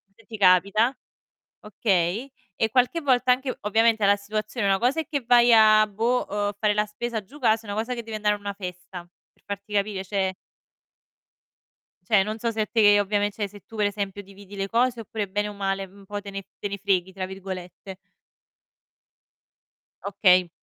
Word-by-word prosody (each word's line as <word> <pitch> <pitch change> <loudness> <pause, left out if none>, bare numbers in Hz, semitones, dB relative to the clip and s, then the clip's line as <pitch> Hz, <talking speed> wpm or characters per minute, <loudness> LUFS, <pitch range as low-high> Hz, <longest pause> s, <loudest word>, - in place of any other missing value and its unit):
se 225 - -22
ti 220 -2 -8
capita, 200 +6 +4 0.7
okay. 205 +3 -1 0.3
E 225 - +1
qualche 255 +7 +1
volta, 255 -2 +3
anche 255 +1 -1
ovviamente 220 +1 +2
alla 200 0 +5
situazione, 215 +1 -3
una 195 0 +3
cosa 270 +7 +1
è - - -9
che 285 -4 -1
vai 240 0 +5
a, 215 -1 +7
boh, 230 +5 0
uhm, 205 0 -1
fare 210 -1 +2
la 210 0 +2
spesa 220 +1 -5
giù 280 +10 -15
casa, 225 -2 +2
e - - -4
una 205 - -4
cosa 240 +3 -2
che 235 - -6
devi 220 -1 -6
andare 210 -1 +1
a - - -8
una 200 0 -5
festa 180 -2 -8 0.3
per - - -35
farti 200 +1 -7
capire, 200 -1 -1
cioè 190 -1 -1 1.7
cioè, 210 -4 +5
non 215 +1 -4
so 235 - -2
se 215 -1 -1
te 205 -3 +5
ovviamen 205 +1 0
se 205 -1 -6
tu 225 - -11
per 210 -1 +2
esempio 200 0 -4
dividi 200 +1 -14
le 195 0 -3
cose, 240 +1 +1
oppure 215 -2 -4
bene 205 +2 -1
o - - -6
male, 195 -1 -2
mhmm, 195 +2 -19
un 200 - -15
po' 205 0 -5
te 200 -1 -9
ne 195 0 -6 0.2
"te 205 - -3
ne 200 0 -5
freghi" 190 -2 0
tra 185 -1 -4
virgolette. 190 0 -8 2.1
Okay. 185 -3 +4
205 Hz, 190 wpm, -25 LUFS, 195-225 Hz, 2.1 s, a